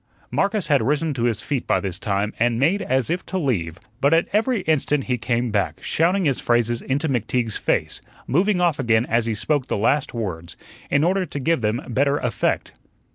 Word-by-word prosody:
Marcus 200 -1 0
had 145 -3 +3
risen 150 +6 0
to 120 -3 -1
his 115 -4 -1
feet 140 -4 -2
by - - +2
this 95 -1 -4
time 100 -1 -1
and 115 0 +2
made 170 +10 +2
as 130 +3 0
if 180 +2 -1
to 190 - -2
leave, 95 - -1 0.2
but 140 +4 +4
at 165 - +2
every 225 +1 +2
instant 150 -3 +1
he 125 - -1
came 120 0 -1
back, 100 -2 0
shouting 180 +3 +1
his 135 -4 +1
phrases 120 -1 +1
into 145 +4 -1
McTeague's 120 -3 -1
face, - - -1 0.2
moving 180 +7 +2
off 170 -5 +2
again 115 -2 +2
as 115 -1 0
he 110 - -1
spoke 145 +4 -1
the - - -1
last 130 +7 +1
words, 90 -8 -5 0.3
in 140 - +2
order 185 +2 +1
to 145 - -5
give 160 0 +1
them 110 +3 -1
better 140 +4 +1
effect. 120 -6 -1
130 Hz, 200 wpm, -22 LUFS, 115-160 Hz, 0.3 s, but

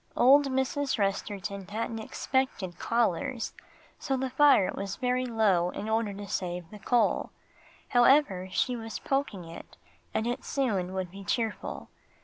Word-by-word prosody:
Old 275 +3 +6
Mrs. 265 +1 0
Resterton 200 -1 -2
hadn't 225 +1 -3
expected 220 -5 -2
callers, 230 0 0 0.5
so 270 -2 -1
the 260 0 -2
fire 270 -8 +5
was 195 -1 -4
very 250 0 0
low 205 -7 +2
in 205 - -5
order 220 -1 +1
to 200 0 -7
save 175 -2 -3
the 210 - -10
coal. 240 +3 +2 0.6
However, 245 -7 +4
she 245 +7 0
was 225 -2 -5
poking 270 -9 -2
it, 165 0 -11 0.3
and 220 - -1
it 245 +2 -2
soon 195 -9 -1
would 185 -2 -3
be 195 +1 -9
cheerful. 220 +2 -3
225 Hz, 140 wpm, -29 LUFS, 195-255 Hz, 0.6 s, Old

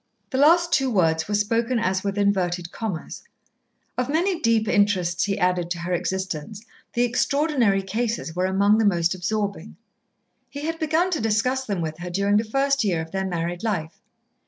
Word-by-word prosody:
The 260 - 0
last 340 +4 +5
two 270 -3 +3
words 160 -7 +1
were 210 - 0
spoken 230 +4 +1
as 190 -4 0
with 200 0 -2
inverted 180 -4 0
commas. 205 -8 -5 0.8
Of 250 +1 -1
many 345 +4 +1
deep 230 -5 +2
interests 190 -5 +2
he 200 -1 -1
added 180 -1 +1
to 175 - -2
her 180 +1 -2
existence, 190 +3 -3 0.3
the 240 - +2
Extraordinary 245 -4 +1
Cases 215 -4 -3
were 180 +1 +1
among 200 +3 +3
the - - +3
most 175 -3 +2
absorbing. 200 +1 -3 0.7
He 285 - -7
had 325 +2 -3
begun 325 +3 +1
to 325 - -1
discuss 230 +5 0
them 200 -6 -2
with 160 0 -4
her 180 0 -5
during 200 +3 +2
the 215 - +2
first 275 +4 +1
year 185 -6 +1
of 160 0 -6
their 190 0 -2
married 175 0 -3
life. 175 -8 -3
205 Hz, 180 wpm, -24 LUFS, 180-245 Hz, 0.8 s, last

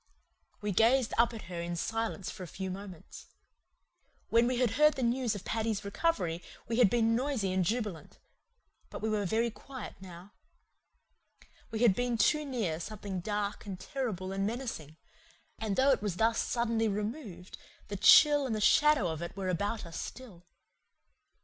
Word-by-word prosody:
We 210 0 -1
gazed 230 +5 +3
up 235 0 +5
at 225 -2 -8
her 175 -1 -6
in 170 0 -3
silence 225 +1 -3
for 205 - -11
a 180 - -6
few 190 +3 -5
moments. 190 -3 -10 1.0
When 230 +1 +4
we 250 0 0
had 245 -3 +2
heard 300 +6 +4
the 265 - -2
news 240 -1 +1
of 200 - -8
Paddy's 220 -2 -2
recovery 200 - -1 0.3
we 225 +1 -1
had 235 -5 +6
been 230 0 +2
noisy 240 -7 -1
and 185 0 +2
jubilant; 210 -3 -3 0.7
but - - -8
we 220 - +1
were 210 -2 0
very 230 +4 +1
quiet 260 +3 -9
now. 180 +1 -11 1.4
We 225 0 -4
had 225 -5 +6
been 245 +2 -1
too 300 +7 +3
near 220 - -2
something 200 0 -5
dark 205 +2 -3
and 190 -2 -6
terrible 215 -10 -4
and 195 0 -2
menacing; 210 - -4 0.6
and 215 -3 -2
though 270 +4 +4
it 260 - +2
was 205 -4 -2
thus 225 +3 +2
suddenly 230 -2 0
removed 210 - -5 0.3
the 205 - -5
chill 290 +7 +7
and 215 -3 -1
shadow 300 -8 +5
of 160 -1 -4
it 170 +3 -6
were 190 -1 -2
about 205 +4 -2
us 170 - -7
still. 190 -9 -10
215 Hz, 170 wpm, -31 LUFS, 190-240 Hz, 1.4 s, chill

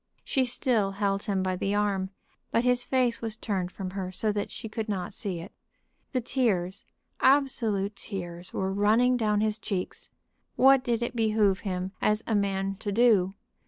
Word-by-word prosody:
She 265 -1 +1
still 235 -5 +1
held 200 0 0
him 195 -2 0
by 185 -1 0
the 195 +3 -1
arm, 200 -2 0 0.4
but 230 - +2
his 250 0 +2
face 250 -2 +1
was 225 -2 -3
turned 190 -5 -2
from 185 -1 -5
her 190 -1 -4
so 210 +3 0
that 205 -1 -2
she 225 - -7
could 220 0 -4
not 190 -2 -3
see 190 -5 -3
it. 170 +5 -9 0.6
The 255 - 0
tears, 200 -7 0 0.3
absolute 230 -8 +2
tears, 175 -4 -6
were 190 0 -1
running 220 +5 +4
down 210 -3 +1
his 215 0 0
cheeks. 195 -4 -4 0.5
What 270 0 +6
did 240 -2 0
it 240 - -3
behoove 215 -4 +2
him 185 -2 -3
as 210 +1 +2
a - - -1
man 195 -1 0
to 205 0 -3
do? 200 -4 +4
205 Hz, 175 wpm, -28 LUFS, 195-230 Hz, 0.6 s, What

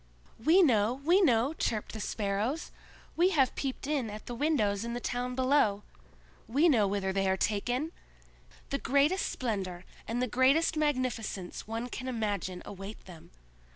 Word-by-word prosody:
"We 345 +7 +6
know! 225 -6 +3
we 360 +5 +5
know!" 255 - +3
chirped 220 -9 -2
the 220 - -6
Sparrows. 210 +8 -2 0.4
"We 350 +2 +4
have 265 -2 +4
peeped 270 -1 -4
in 280 -6 -1
at 210 +1 -8
the 245 - -5
windows 230 -7 +1
in 235 0 -4
the - - -2
town 245 +1 -3
below! 255 -6 +2 0.6
We 285 +9 +3
know 225 -10 +4
whither 195 -1 -1
they 195 0 +1
are 190 - +1
taken! 245 +10 -1 0.8
The 275 - 0
greatest 285 +9 +2
splendor 190 -7 -3 0.2
and 230 +2 -2
the 250 - +2
greatest 265 +7 +3
magnificence 255 -12 -2
one 225 +2 -3
can 255 +1 -6
imagine 205 -6 -2
await 195 +2 -9
them. 170 -4 -13
240 Hz, 155 wpm, -30 LUFS, 205-280 Hz, 0.8 s, We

